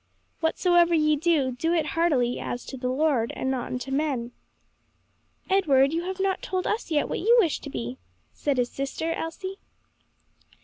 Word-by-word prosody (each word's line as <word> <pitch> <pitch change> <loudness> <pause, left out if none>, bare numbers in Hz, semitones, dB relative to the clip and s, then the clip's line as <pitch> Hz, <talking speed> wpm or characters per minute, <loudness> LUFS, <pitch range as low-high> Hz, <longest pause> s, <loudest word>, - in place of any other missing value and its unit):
Whatsoever 345 +1 +3
ye 305 -1 +3
do, 300 -4 +2
do 325 +7 -1
it 320 -3 +1
heartily, 275 -8 +1
as 245 - -5
to - - -7
the 250 -1 -3
Lord, 260 -4 +1
and 260 - -1
not 255 -2 -2
unto 250 +2 -5
men.'" 270 -4 -1 1.2
"Edward, 290 -8 +3
you 335 +1 -1
have 375 +1 -4
not 385 0 0
told 370 -1 -2
us 430 -3 -2
yet 300 -3 +1
what - - -3
you 465 +6 +4
wish 340 -9 +2
to - - -8
be," 125 0 -5 0.3
said 285 -3 -1
his 245 -1 0
sister 275 +4 -3
Elsie. 375 +5 -5
305 Hz, 170 wpm, -26 LUFS, 260-345 Hz, 1.2 s, you